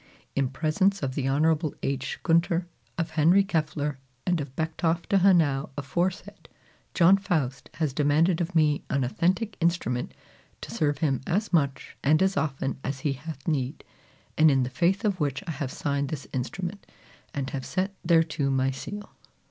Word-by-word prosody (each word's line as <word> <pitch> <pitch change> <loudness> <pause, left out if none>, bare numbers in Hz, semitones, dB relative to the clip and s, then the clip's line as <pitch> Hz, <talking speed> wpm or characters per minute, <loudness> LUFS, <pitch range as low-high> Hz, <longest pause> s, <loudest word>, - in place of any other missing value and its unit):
In 140 -2 +1
presence 175 +6 +1
of 130 -1 -1
the 135 -1 -1
Honorable 155 +2 +2
H. 135 -1 -2
Gunter, 170 +1 +2 0.3
of 165 -1 -2
Henry 165 +5 +5
Keffler, 150 -6 -1 0.3
and 175 -3 +1
of 135 -2 -8
Becktoff 165 +1 -1
de 200 - +3
Hanau 165 -8 +3
aforesaid, 175 +7 -3 0.5
John 180 +3 +6
Faust 150 -10 -2
has 155 -5 -1
demanded 155 +5 +3
of 170 +1 -3
me 150 -2 +3
an 140 -1 +1
authentic 190 - 0
instrument 165 -8 0 0.5
to - - -7
serve 145 -2 0
him 135 -3 +1
as 205 +3 0
much 140 -5 0
and 155 +5 +4
as 190 0 +2
often 135 -2 -1
as 135 -1 -3
he 145 -1 0
hath 140 0 -9
need, 140 -5 -1 0.6
and 155 0 +7
in 135 -2 +3
the 125 - -3
faith 180 - +1
of 200 -3 +1
which 140 0 -1
I 170 - -3
have 145 -3 -4
signed 140 -1 -1
this 150 -3 -5
instrument, 175 +9 -4 0.5
and 135 -2 -2
have 135 -2 -4
set 190 +6 -2
thereto 160 -4 +2
my 135 0 +2
seal." 205 +10 -7
155 Hz, 165 wpm, -27 LUFS, 140-175 Hz, 0.6 s, and